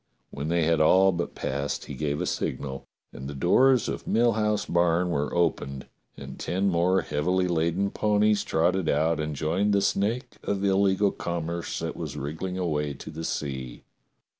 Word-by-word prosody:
When 70 +2 -5
they 85 0 +1
had 80 0 +2
all 95 +5 +5
but 85 -1 -4
passed 70 +1 -3
he - - -7
gave 75 +1 -2
a - - -1
signal, 65 -1 -3 0.3
and 65 +2 -7
the 70 - -6
doors 125 - +4
of - - -5
Mill 120 +1 +3
House 105 -1 0
barn 85 +1 +2
were 75 -2 -1
opened 70 -6 -1 0.3
and - - -9
ten 95 +3 0
more 90 +2 +2
heavily 90 +5 0
laden 85 +3 0
ponies 105 0 +2
trotted 85 +1 +1
out 80 0 +1
and 75 -1 -3
joined 90 +8 0
the 100 - +4
snake 105 +6 -1
of 100 0 -2
illegal 100 0 +3
com 85 -2 -4
merce 85 +1 -4
that - - -4
was - - -6
wriggling 80 +6 -4
away 75 -5 -1
to 75 - -9
the 80 +1 -7
sea. 65 -6 -4
85 Hz, 175 wpm, -26 LUFS, 75-95 Hz, 0.3 s, all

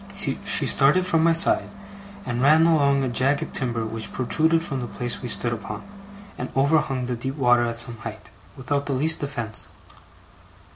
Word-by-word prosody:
She - - +2 0.3
started 150 +7 +3
from 165 -3 +1
my 165 0 +4
side, 165 - +5 0.6
and 120 0 -3
ran 155 +4 +5
along 140 -4 +2
a - - -1
jagged 130 +4 -1
timber 120 -4 -2
which 110 0 -6
protruded 160 +6 +1
from 135 -6 -4
the 120 - -5
place 120 +1 -5
we 125 - -6
stood 120 +1 -2
upon, 105 -2 -7 0.6
and 125 - -5
overhung 135 -2 +1
the 125 0 -3
deep 130 +3 -5
water 120 -4 +2
at 115 0 -5
some 120 0 +1
height, 110 -4 -10 0.3
without 140 +2 -3
the 140 - -1
least 155 +5 +1
defence. 120 -7 -1
130 Hz, 175 wpm, -23 LUFS, 120-145 Hz, 0.6 s, side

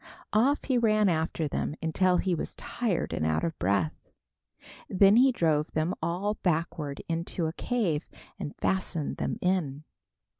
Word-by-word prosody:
Off 260 +7 +3
he 255 -3 +1
ran 215 -2 +3
after 160 -1 0
them 145 - -2
until 180 +3 +2
he 185 +1 +1
was 165 - -4
tired 220 -8 -2
and - - -1
out 80 0 +1
of 165 -2 -1
breath. 95 -4 0 0.8
Then 195 +2 +6
he 260 +3 +6
drove 155 -9 +1
them 155 +4 0
all 180 +6 -1
backward 155 -4 -1
into 165 +1 -2
a 160 - -2
cave, 180 -9 -1 0.3
and 145 - -5
fastened 185 -5 -1
them - - -2
in. 160 -6 0
170 Hz, 150 wpm, -28 LUFS, 155-200 Hz, 0.8 s, Then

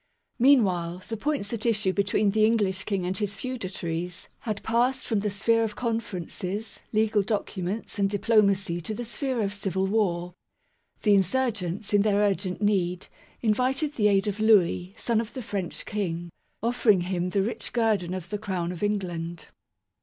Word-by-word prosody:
Meanwhile, 185 -9 +3
the 225 - -2
points 255 -2 -2
at 225 -2 -3
issue 210 -5 +1
between 200 +1 +2
the 215 +1 +2
English 205 -4 +2
King 195 -4 -1
and 185 +1 -1
his 205 0 -2
feudatories 180 -7 -4
had 215 -3 -4
passed 245 +4 +1
from 220 -3 +1
the 210 +1 -1
sphere 225 +3 +2
of 215 -2 -2
conferences, 220 -3 -3
legal 215 -1 +3
documents 205 0 -3
and 195 -1 +3
diplomacy 200 -4 +2
to 215 +6 -4
the 240 - -5
sphere 240 +1 -2
of 200 0 -1
civil 190 -2 -1
war. 180 -4 0 0.7
The 210 - +5
insurgents, 200 -1 0
in 205 - +6
their 210 -1 +2
urgent 200 -1 0
need, 180 -3 +1 0.3
invited 260 +7 +1
the 210 -7 +3
aid 195 -1 +3
of 205 0 -2
Louis, 195 -4 +3
son 230 -2 +1
of 230 - -9
the 255 - -4
French 195 -4 -4
King, 175 -5 -3 0.3
offering 230 -5 +3
him 180 0 -1
the 195 +1 +1
rich 225 - -3
guerdon 210 -7 +1
of 185 0 -7
the 210 - -2
Crown 185 -4 -2
of 180 - -7
England. 175 -5 -2
205 Hz, 165 wpm, -27 LUFS, 185-225 Hz, 0.7 s, in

